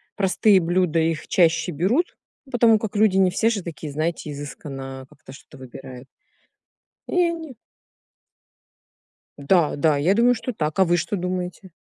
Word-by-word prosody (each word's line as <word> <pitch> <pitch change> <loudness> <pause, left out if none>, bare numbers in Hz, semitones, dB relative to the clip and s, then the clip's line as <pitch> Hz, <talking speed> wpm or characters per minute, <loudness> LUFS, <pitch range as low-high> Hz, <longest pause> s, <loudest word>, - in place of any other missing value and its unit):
простые 195 +1 +3
блюда- 175 -1 0
их 160 0 -1
чаще 165 -2 +2
берут, 200 - 0 0.4
потому 230 -3 +4
как 215 -1 -5
люди 205 -2 +3
не 190 -1 +4
все 225 +5 +1
же 210 -4 -2
такие, 155 -3 -7
знаете, 155 0 -3
изысканно 135 -2 -8
как-то - - -15
что-то 140 +1 -15
выбирают. 130 0 -11 1.0
И - - -6 0.2
они 320 -5 -7 1.8
Да, 155 +3 +2
да, 150 0 +2
я 160 +7 +2
думаю, 240 +3 +3
что 245 +2 -5
так. 155 -6 -3
А 190 - +6
вы 175 0 +2
что 175 - -2
думаете? 180 0 -5
175 Hz, 145 wpm, -22 LUFS, 150-205 Hz, 1.8 s, А